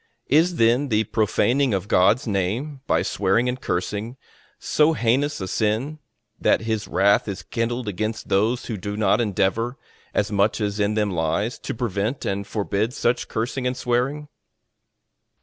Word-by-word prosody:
Is 165 +5 +4
then 120 +2 +3
the 110 -1 +2
profaning 120 +4 +1
of 95 +1 -3
God's 105 +6 +3
name, 115 +8 -2
by - - +2
swearing 100 +5 +1
and 125 +1 -2
cursing, 105 +7 -3 0.4
so 155 +1 +2
heinous 140 +3 +1
a 95 - -4
sin, 110 +11 -1 0.4
that - - +3
his 110 -2 -2
wrath 100 +2 +3
is 100 -2 -5
kindled 120 0 -2
against 110 +3 -3
those 110 +6 +1
who 110 - -4
do 100 +2 -5
not 105 +2 +3
endeavour, 115 +4 0 0.3
as 105 0 0
much 100 +2 +2
as 105 -1 -2
in 105 +1 +1
them 105 -2 +1
lies, 90 +7 -1
to - - -5
prevent 110 +2 -2
and 100 0 -2
forbid 105 +2 -1
such 120 +1 0
cursing 125 +3 -2
and 125 0 -2
swearing? 130 +5 -1
110 Hz, 155 wpm, -23 LUFS, 100-125 Hz, 0.4 s, Is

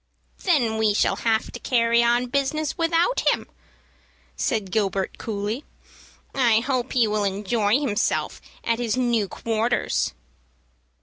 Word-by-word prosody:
"Then 240 - +1
we 215 -2 +2
shall - - +2
have 225 -1 0
to - - -8
carry 235 -2 +2
on 240 +1 +2
business 280 +3 -1
without 335 +8 +1
him," - - +2 0.9
said 210 -6 -1
Gilbert, 195 -2 -1
coolly. 215 +4 -3 0.7
"I 235 -4 +3
hope 255 0 -2
he 245 -3 +4
will 210 -1 0
enjoy 205 +4 +1
himself 235 -8 -1 0.2
at 230 0 0
his 240 0 -1
new 235 -5 +1
quarters." 225 - -1
230 Hz, 125 wpm, -24 LUFS, 215-255 Hz, 0.9 s, he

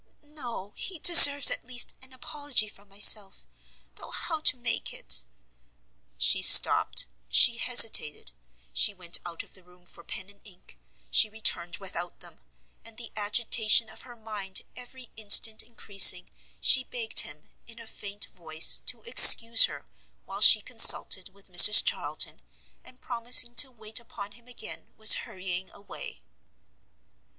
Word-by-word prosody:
"No, 245 -9 -13
he 375 - -9
deserves, 285 -4 +6
at - - -7
least, 245 -1 -4
an 260 0 -12
apology 260 -2 -5
from 205 -1 -17
myself, 200 - +1 0.5
though - - -16
how 320 - -9
to 280 -4 -1
make 240 -1 -7
it - - -1 0.5
" - - -46
She - - -1
stopt, - - +3 0.2
she 235 - +1
hesitated, 225 - 0 0.4
she 205 - -1
went 175 -2 -5
out 170 -1 -11
of - - -15
the 185 - -14
room 180 0 -28
for 170 - -18
pen 190 +1 -12
and 200 0 -25
ink, 180 - -19 0.3
she 215 - 0
returned 175 -5 -4
without 175 -3 -9
them, - - -16 0.4
and 230 -1 -15
the 235 -1 -11
agitation 220 +1 -1
of 220 - -14
her 245 -2 -17
mind 210 -4 -6
every 250 0 -13
instant 220 +1 +1
encreasing, 195 -5 +1 0.3
she 260 - +2
begged 235 -3 -2
him, 150 +1 -6 0.2
in 230 -1 -13
a 230 - -11
faint 205 -1 -9
voice, 160 -2 0
to - - -5
excuse 230 - +6
her - - -14 0.4
while - - -12
she - - +5
consulted 190 +1 +3
with 195 +1 -19
Mrs 210 +4 +6
Charlton, - - -6 0.4
and 255 - -19
promising 240 0 0
to 265 +3 +2
wait 220 -2 -8
upon 205 -3 -13
him 235 +3 -23
again, 245 -3 -13
was 220 0 +4 0.2
hurrying 185 0 -10
away. 200 - -13
215 Hz, 150 wpm, -23 LUFS, 190-240 Hz, 0.5 s, deserves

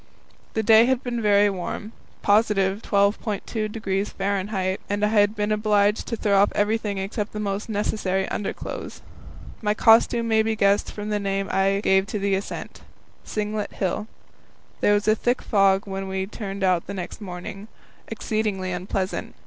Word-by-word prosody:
The 220 - +1
day 225 +1 +7
had 260 0 +1
been 240 -2 -2
very 205 -1 +4
warm, 200 +2 -4 0.3
+12.2° 200 -1 0
F., - - -7
and 205 +1 +1
I - - +3
had 210 0 +3
been 210 0 -1
obliged 210 0 +2
to 230 - -2
throw 205 -3 +2
off 205 - +3
everything 210 -1 0
except 205 +2 -3
the 210 - -4
most 205 +1 -3
necessary 200 -2 -1
underclothes. 205 - -5 0.6
My 210 -1 +1
costume 230 +1 +4
may 220 -1 +3
be 220 0 0
guessed 200 -1 +2
from 210 0 -6
the 210 -1 0
name 195 -1 -1
I 195 +1 +2
gave 190 0 +3
to 215 - -3
the 200 -1 0
ascent 195 +1 -4 0.4
Singlet 210 0 -3
Hill. 195 +3 -2 0.7
There 205 - +4
was 205 +1 -1
a 215 - +6
thick 245 +3 0
fog 195 -2 +3
when 195 -1 -4
we 190 0 -2
turned 200 -1 -6
out 180 -2 +1
next 195 +1 -6
morning, 195 +2 -7 0.4
exceedingly 215 -4 -2
unpleasant. 185 +1 -3
205 Hz, 155 wpm, -24 LUFS, 195-215 Hz, 0.7 s, day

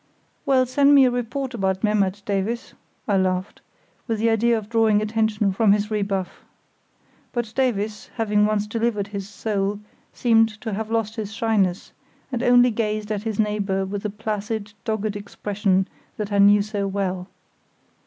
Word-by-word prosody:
"Well, 260 -2 +4
send 280 +3 +4
me 275 -2 +7
a 250 - +3
report 245 +2 -3
about 190 -3 -1
Memmert, 205 -2 +1
Davies," 205 +4 -2 0.3
I 200 -3 +2
laughed, 185 0 -1 0.5
with 225 -2 0
the 225 +2 +2
idea 230 +1 +3
of 215 -2 -6
drawing 225 -2 +3
attention 215 -2 0
from 205 0 +4
his 210 +1 -1
rebuff. 200 -3 -2 0.9
But 240 -2 -3
Davies, 215 -5 -1
having 210 -2 +2
once 210 -1 0
delivered 220 -2 -1
his 200 -1 -6
soul, 205 -1 -2 0.3
seemed 225 -2 +3
to 220 -3 -4
have 220 +2 -3
lost 225 0 -1
his 215 -2 -4
shyness, 215 -5 0 0.4
and 245 -2 -2
only 245 0 +5
gazed 215 -1 -2
at 205 -2 -1
his 220 -1 -4
neighbour 205 -2 0
with 200 +1 -4
the 210 - -2
placid, 210 0 -4
dogged 215 -1 -1
expression 200 -1 -1 0.3
that 210 -1 -4
I 200 - +1
knew 200 +1 +6
so 205 -1 -2
well. 190 -2 -2
210 Hz, 160 wpm, -23 LUFS, 200-225 Hz, 0.9 s, me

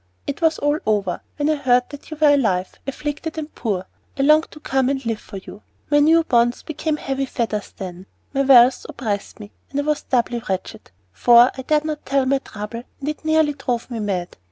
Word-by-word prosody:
It 285 - -4
was 320 -1 +3
all 290 +1 +1
over, 200 -5 0
when 290 -1 -1
I 310 -1 +2
heard 250 -3 +3
that 285 - -11
you 310 - -7
were 300 -2 +6
alive, 195 -10 +1
afflicted, 295 +3 -4
and 310 -1 -5
poor. 195 -5 -2 0.3
I 275 - +1
longed 305 +2 +4
to 305 - -13
come 265 -3 0
and 270 -2 -2
live 225 -2 -1
for 200 - -10
you. 200 +2 -11 0.3
My 290 - +5
new 325 +3 +5
bonds 240 -4 +2
became 315 0 -2
heavy 270 -1 -2
fetters 220 -4 -3
then, 185 0 -7 0.3
my 275 - +1
wealth 255 -2 +6
oppressed 210 -4 -4
me, 210 0 -10 0.2
and 280 - -2
I - - 0
was 300 0 0
doubly 240 -1 0
wretched 190 -1 -4 0.2
for 240 - +6
I 265 - -5
dared 300 +3 +1
not 305 -1 -4
tell 275 -1 +1
my 270 +1 +2
trouble, 210 -1 -7 0.2
and 280 - -3
it 305 - -5
nearly 315 -1 +3
drove 250 -3 -3
me 235 - -3
mad. 190 -4 -3
265 Hz, 210 wpm, -21 LUFS, 225-295 Hz, 0.3 s, were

